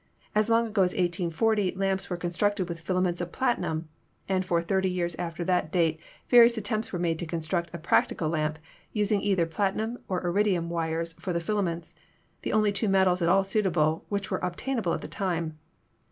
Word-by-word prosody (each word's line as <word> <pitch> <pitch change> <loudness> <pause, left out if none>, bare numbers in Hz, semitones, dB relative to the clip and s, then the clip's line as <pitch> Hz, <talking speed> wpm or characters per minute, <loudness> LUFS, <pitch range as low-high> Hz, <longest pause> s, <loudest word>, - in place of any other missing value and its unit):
As 215 +1 +3
long 230 0 +4
ago 215 -3 0
as 180 -1 +2
1840 180 +3 +1
lamps 195 0 -1
were 180 - -2
constructed 180 +2 0
with 170 -1 -6
filaments 180 0 0
of 175 0 -4
platinum, 205 - -1 0.4
and 190 -1 +1
for 175 -2 +1
thirty 190 +2 +1
years 175 -1 -1
after 170 0 -3
that 180 -3 0
date 165 -3 +2 0.3
various 240 -1 +7
attempts 215 +1 -2
were 180 - -2
made 165 -2 0
to 170 - -4
construct 170 +1 -2
a 170 - -5
practical 165 0 +1
lamp, 155 -1 -1 0.4
using 210 -1 +1
either 190 -4 +2
platinum 205 +7 -1
or 185 -1 -2
iridium 175 -2 +1
wires 165 0 -2
for 180 - -3
the 170 - +1
fila 205 +5 0
ments, 170 -3 -3 0.5
the - - -3
only 215 -1 +3
two 205 +1 0
metals 190 -2 +3
at 170 - +2
all 195 +2 +5
suitable 175 -6 +1
which 200 -2 -2
were - - -2
ob 180 -1 -2
tainable 235 -10 -1
at - - -5
the - - -6
time. 165 -5 -2
180 Hz, 195 wpm, -27 LUFS, 170-205 Hz, 0.5 s, various